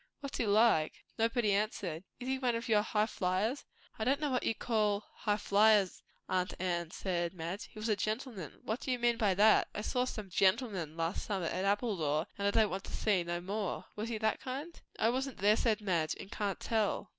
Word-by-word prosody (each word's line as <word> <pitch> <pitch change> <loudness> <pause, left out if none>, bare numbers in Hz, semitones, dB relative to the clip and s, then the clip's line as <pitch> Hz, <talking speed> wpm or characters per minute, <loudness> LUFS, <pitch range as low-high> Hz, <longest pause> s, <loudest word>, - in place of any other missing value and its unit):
"What's 280 -1 -5
he 230 - +1
like?" 205 -7 +3 0.2
Nobody 230 -2 +2
answered. 195 -5 -1 0.2
"Is 250 - -6
he 265 0 0
one 250 -3 +1
of 230 +1 -3
your 215 -2 +4
high 210 0 +1
flyers?" 210 +6 -1 0.3
"I - - 0
don't 270 +5 +2
know 295 -2 -1
what 255 - +1
you 225 - +1
call 210 -3 0
high 210 -1 0
flyers, 210 -2 +4 0.3
aunt 185 -1 0
Anne," 175 -2 -1
said 175 0 -2
Madge. 175 +4 -4
"He - - -17
was 215 +1 -3
a 215 - +3
gentleman." 215 - -4
"What 220 +3 -2
do - - -6
you 250 - +2
mean 240 -1 +2
by 200 -4 +2
that? 215 +3 +5
I 210 - -2
saw 250 +3 0
some 215 -6 -6
'gentlemen' 190 - +1
last 165 +3 -2
summer 195 -5 -1
at 185 +3 -1
Appledore 190 -8 +1
and 200 0 -1
I - - +5
don't 215 -1 +3
want 190 +1 -4
to - - -9
see 200 -5 +2
no 175 0 -3
more. 200 +1 -3
Was 215 +2 -4
he 230 - -2
that 220 0 0
kind?" 280 +6 -6 0.2
"I 225 - +3
wasn't 265 +1 -2
there," 205 +2 +4
said 220 -2 +1
Madge, 170 -6 0
"and 195 - -9
can't 200 -3 -2
tell. 220 -3 0
210 Hz, 215 wpm, -33 LUFS, 185-230 Hz, 0.3 s, that